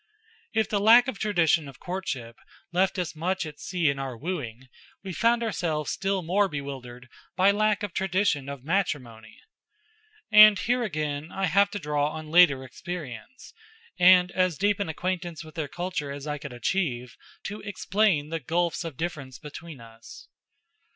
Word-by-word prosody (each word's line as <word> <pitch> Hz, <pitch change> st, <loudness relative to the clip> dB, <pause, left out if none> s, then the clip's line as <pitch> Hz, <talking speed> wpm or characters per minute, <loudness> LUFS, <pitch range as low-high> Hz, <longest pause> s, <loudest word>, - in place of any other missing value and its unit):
If 220 Hz, -1 st, +1 dB
the 205 Hz, -, 0 dB
lack 230 Hz, +5 st, +7 dB
of 255 Hz, -6 st, -4 dB
tradition 170 Hz, -7 st, +2 dB
of 135 Hz, -, -12 dB
courtship 135 Hz, -11 st, -5 dB, 0.3 s
left 185 Hz, +2 st, +1 dB
us 180 Hz, -3 st, -3 dB
much 180 Hz, +3 st, -1 dB
at 150 Hz, -1 st, -9 dB
sea 175 Hz, -3 st, -1 dB
in 140 Hz, -1 st, +1 dB
our 135 Hz, -3 st, -5 dB
wooing, 130 Hz, -6 st, -5 dB, 0.4 s
we 190 Hz, -2 st, -6 dB
found 230 Hz, +5 st, +2 dB
ourselves 165 Hz, -9 st, -2 dB
still 195 Hz, -1 st, -1 dB
more 195 Hz, +5 st, +2 dB
bewildered 135 Hz, -5 st, -7 dB, 0.3 s
by 190 Hz, +2 st, +5 dB
lack 215 Hz, 0 st, +1 dB
of 205 Hz, -3 st, -4 dB
tradition 185 Hz, -7 st, 0 dB
of 140 Hz, -3 st, -7 dB
matrimony. 135 Hz, -, -3 dB, 0.9 s
And 210 Hz, -1 st, +9 dB
here 245 Hz, +5 st, 0 dB
again, 155 Hz, -7 st, -3 dB
I 195 Hz, -, -1 dB
have 200 Hz, +4 st, +3 dB
to 205 Hz, -, -5 dB
draw 150 Hz, -4 st, 0 dB
on 155 Hz, -1 st, -8 dB
later 160 Hz, -6 st, +6 dB
experience, 155 Hz, -, -8 dB, 0.5 s
and 180 Hz, 0 st, +6 dB
as 185 Hz, -4 st, +1 dB
deep 205 Hz, +1 st, +1 dB
an 200 Hz, -, -2 dB
acquaintance 175 Hz, -1 st, -3 dB
with 155 Hz, -1 st, -13 dB
their 160 Hz, -4 st, -3 dB
culture 175 Hz, -3 st, -4 dB
as 140 Hz, 0 st, -7 dB
I 150 Hz, -1 st, -3 dB
could 140 Hz, -1 st, -8 dB
achieve, 125 Hz, -, -2 dB, 0.3 s
to 205 Hz, +2 st, -6 dB
explain 200 Hz, -6 st, 0 dB
the 165 Hz, 0 st, -3 dB
gulfs 170 Hz, +5 st, -1 dB
of 160 Hz, -6 st, -7 dB
difference 140 Hz, -6 st, -5 dB
between 150 Hz, +1 st, -10 dB
us. 115 Hz, 0 st, -13 dB
170 Hz, 165 wpm, -26 LUFS, 140-195 Hz, 0.9 s, And